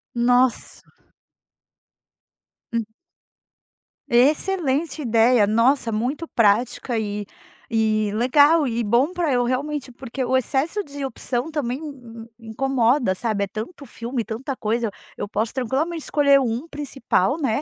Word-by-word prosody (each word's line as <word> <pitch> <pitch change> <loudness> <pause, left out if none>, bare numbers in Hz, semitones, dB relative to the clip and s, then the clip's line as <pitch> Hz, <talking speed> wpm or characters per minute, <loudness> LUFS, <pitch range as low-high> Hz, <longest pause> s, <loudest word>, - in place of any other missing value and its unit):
Nossa. 245 +1 +2 1.9
Hum. 230 -1 0 1.2
Excelente 300 +3 +2
ideia, 230 -2 +4
nossa, 230 +3 +2
muito 255 +9 -2
prática 230 +2 +1
e 205 -1 -3 0.5
e 215 -2 +1
legal, 285 +6 +4
e 235 -1 -1
bom 240 - +2
pra 345 -5 0
eu 245 -1 +2
realmente 265 +1 -2
porque 260 +1 -5
o 260 - +1
excesso 275 - 0
de 285 -3 -6
opção 255 +1 -3
também 270 -6 -2
m 245 -7 -10
m 230 -1 -12
incomoda, 245 -2 +1
sabe. 210 -1 -1
É - - -12
tanto 225 - -7
filme, 235 0 -4
tanta 255 +4 -5
coisa. 225 +1 -1 0.3
Eu - - -3
posso 220 +2 -1
tranquilamente 280 +6 -2
escolher 280 -2 +4
um 245 +4 -2
principal, 275 - -1
né, 265 -2 0
250 Hz, 125 wpm, -22 LUFS, 230-285 Hz, 1.9 s, ideia